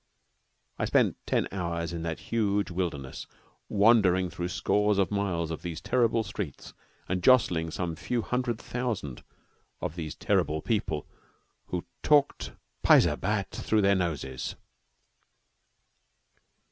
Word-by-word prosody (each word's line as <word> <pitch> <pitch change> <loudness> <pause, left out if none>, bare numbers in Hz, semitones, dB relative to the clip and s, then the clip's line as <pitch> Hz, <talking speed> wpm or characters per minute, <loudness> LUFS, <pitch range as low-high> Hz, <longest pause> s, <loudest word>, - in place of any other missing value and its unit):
I - - +1
spent - - +3
ten - - +1
hours 85 -3 -3
in 85 - -4
that 80 -1 -4
huge 105 -4 +1
wilderness, 80 -7 -4 0.4
wandering 100 -4 +4
through 85 - -3
scores 105 +3 +1
of 100 -1 +2
miles 90 -5 -1
of 80 - -5
these 85 -2 -5
terrible 115 +4 +2
streets 95 -7 -6 0.3
and 95 0 -1
jostling 90 -8 +4
some 85 0 -3
few 115 +8 -2
hundred 125 -1 -1
thousand 115 - -4 0.6
of - - -3
these 80 -4 -5
terrible 80 +1 +1
people 80 -6 -1 0.6
who 90 -1 -3 0.2
talked 145 -2 +2 0.3
paisa - - +6
bat 100 0 -1
through 110 -2 0
their 100 0 +5
noses. 75 -8 -2
95 Hz, 120 wpm, -28 LUFS, 85-105 Hz, 0.6 s, paisa